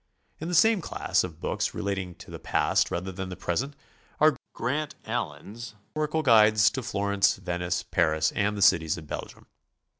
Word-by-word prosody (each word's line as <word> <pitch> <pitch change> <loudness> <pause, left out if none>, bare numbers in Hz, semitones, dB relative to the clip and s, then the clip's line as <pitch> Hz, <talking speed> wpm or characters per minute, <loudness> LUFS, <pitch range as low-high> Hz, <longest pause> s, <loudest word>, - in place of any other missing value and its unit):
In 160 - -5
the 175 - -1
same 220 +3 +5
class, - - 0
of 85 -3 -7
boo - - -2
ks - - -1
relating 95 -3 -3
to - - -13
the - - -7
past - - +1
rather 90 +2 -3
than 95 0 -6
the 90 - -6
present, 135 +14 -2 0.4
are 155 -1 +5 0.2
Grant 150 +5 -2
Allen's 110 +1 -5 0.2
Historical 155 +1 -1
Guides 110 -3 +6
to 130 - -3
Florence, 100 -2 +1
Venice, 90 -2 -2
Paris 80 0 +1
and 105 0 0
the 100 - +2
cities 85 -5 +4
of 80 - -9
Belgium. - - -7
100 Hz, 175 wpm, -27 LUFS, 90-130 Hz, 0.4 s, Guides